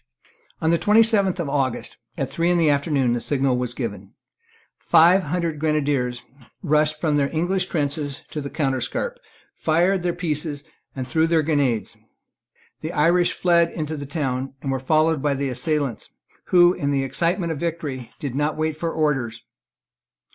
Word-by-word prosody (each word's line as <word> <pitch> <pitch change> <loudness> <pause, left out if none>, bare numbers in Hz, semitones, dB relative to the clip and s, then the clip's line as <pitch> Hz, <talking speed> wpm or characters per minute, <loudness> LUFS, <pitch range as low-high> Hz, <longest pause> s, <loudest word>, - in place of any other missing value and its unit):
On 160 0 +2
the 170 - +2
twenty 215 +5 +5
seventh 200 -5 +2
of 170 - -2
August, 135 -3 -2 0.2
at - - -2
three 170 +1 0
in 175 - +3
the 160 -3 +4
afternoon, 140 -4 +1
the 120 - -2
signal 135 -3 +1
was 125 -1 -3
given. 100 -4 -5 0.7
Five 170 +3 +5
hundred 165 0 -2
grenadiers 140 -5 0 0.4
rushed 155 -1 +2
from 155 -3 +1
the 140 -1 +1
English 175 +4 0
trenches 145 -2 -2
to 150 - -4
the 140 - -5
counterscarp, 140 - -2 0.4
fired 175 +4 +1
their 175 0 0
pieces, 150 -3 -3 0.3
and 130 -2 -4
threw 160 +4 +2
their 165 -1 +2
grenades. 140 -7 0 0.8
The - - -5
Irish 175 +3 +3
fled 170 -2 +3
into 155 -2 -4
the 145 -2 -6
town, 135 -3 -3
and 135 - -1
were 135 - -1
followed 155 +2 +2
by 145 -1 +1
the 140 0 -2
assailants, 130 -1 -2 0.4
who, 175 -1 +5
in 140 - -2
the 140 -1 +1
excitement 170 +6 -1
of 155 - -4
victory, 145 -7 -4
did 140 -4 -5
not 150 +3 -1
wait 155 0 -1
for 165 0 -2
orders. 135 -8 -1
150 Hz, 165 wpm, -23 LUFS, 135-170 Hz, 0.8 s, twenty